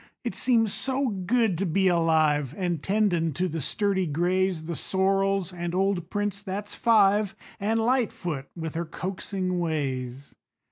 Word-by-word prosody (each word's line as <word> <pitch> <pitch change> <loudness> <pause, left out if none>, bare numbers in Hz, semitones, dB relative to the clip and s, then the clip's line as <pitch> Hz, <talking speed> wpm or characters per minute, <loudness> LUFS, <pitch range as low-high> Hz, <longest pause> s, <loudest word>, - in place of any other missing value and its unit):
It - - -3
seems 225 -5 +2
so 265 0 +1
good 200 -1 +1
to 195 - +1
be 190 +4 +2
alive, 155 -5 +2
An' 175 -4 -1
tendin' 180 -4 +1
to 180 +6 0
the 165 -2 -4
sturdy 195 - 0
grays, 175 +2 0
The 170 +1 -4
sorrels, 195 0 0
and 175 0 -4
old 190 -2 0
Prince, 205 0 -2
that's 205 +1 -5
five 210 -3 +3 0.2
An' 215 +3 0
Lightfoot 220 - 0
with 160 -2 -5
her 170 +1 -2
coaxing 185 +2 -3
ways. 135 -5 -3
185 Hz, 145 wpm, -26 LUFS, 165-200 Hz, 0.2 s, five